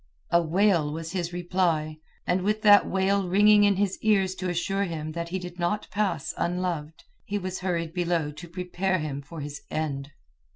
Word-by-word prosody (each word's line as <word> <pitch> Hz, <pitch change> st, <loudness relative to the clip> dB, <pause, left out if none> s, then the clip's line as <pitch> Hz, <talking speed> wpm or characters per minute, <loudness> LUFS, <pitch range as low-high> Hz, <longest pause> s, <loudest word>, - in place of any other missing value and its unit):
A 170 Hz, -, +5 dB
wail 170 Hz, -2 st, +2 dB
was 165 Hz, +1 st, -5 dB
his 175 Hz, -2 st, -2 dB
reply, 175 Hz, -3 st, 0 dB, 0.3 s
and 180 Hz, +1 st, +1 dB
with 215 Hz, +3 st, 0 dB
that 205 Hz, -2 st, +7 dB
wail 195 Hz, 0 st, +1 dB
ringing 205 Hz, +2 st, +6 dB
in 200 Hz, -1 st, +4 dB
his 195 Hz, 0 st, 0 dB
ears 195 Hz, -4 st, +3 dB
to 185 Hz, -1 st, -4 dB
assure 195 Hz, +3 st, 0 dB
him 155 Hz, -3 st, -4 dB
that 170 Hz, +1 st, -4 dB
he 185 Hz, -, -2 dB
did 180 Hz, -1 st, -8 dB
not 175 Hz, +5 st, -1 dB
pass 200 Hz, -7 st, -1 dB
unloved, 170 Hz, -3 st, -2 dB, 0.2 s
he 205 Hz, -, -3 dB
was 185 Hz, -1 st, -4 dB
hurried 170 Hz, -3 st, -2 dB
below 170 Hz, -4 st, 0 dB
to 150 Hz, +4 st, -10 dB
prepare 180 Hz, +2 st, -1 dB
him 150 Hz, -4 st, -4 dB
for 150 Hz, +3 st, -9 dB
his 145 Hz, 0 st, -6 dB
end. 145 Hz, -3 st, -3 dB
180 Hz, 180 wpm, -26 LUFS, 160-195 Hz, 0.3 s, that